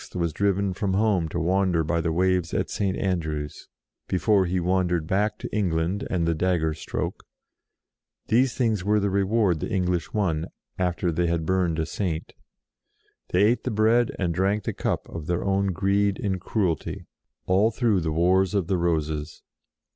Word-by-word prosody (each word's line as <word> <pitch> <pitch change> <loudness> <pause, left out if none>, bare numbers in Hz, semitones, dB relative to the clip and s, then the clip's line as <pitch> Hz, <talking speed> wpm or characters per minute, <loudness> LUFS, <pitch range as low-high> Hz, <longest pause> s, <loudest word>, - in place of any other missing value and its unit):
was 85 -3 -1
driven 100 -1 +1
from 95 0 -1
home 100 -6 +2
to 85 - -3
wander 90 -1 +2
by 85 +2 0
the 80 0 -1
waves 90 0 +1
at - - -1
St. 95 -2 -1
Andrews, 80 -6 -3 0.4
before 95 0 +2
he 90 +1 0
wandered 90 -2 +1
back 100 +5 0
to - - -6
England 90 -1 0
and 85 -3 0
the 85 - +2
dagger 80 -2 +1
stroke - - -4 1.0
these 125 +2 +2
things 110 -7 0
were 105 +2 +2
the 100 -1 0
reward 100 -3 +2
the - - -4
English 90 -3 -1
won, 85 -7 0 0.3
after 90 -1 0
they 85 +2 0
had 85 -1 -1
burned 90 -2 +1
a 80 - 0
Saint. 85 -4 -3 1.0
They 90 +3 +3
ate 115 +4 +2
the - - -1
bread 110 +2 +3
and 90 -3 0
drank 100 +4 +1
the - - -2
cup - - -2
of 80 -2 -7
their 85 0 -1
own 100 0 +1
greed 100 +2 +1
and 95 -3 -2
cruelty 90 -8 -2 0.4
all 95 +4 +3
through 115 -5 +1
the 80 -2 -2
Wars 90 +4 +2
of 100 -4 +1
the 95 +2 0
Roses. 80 -3 -2
95 Hz, 170 wpm, -25 LUFS, 85-100 Hz, 1.0 s, They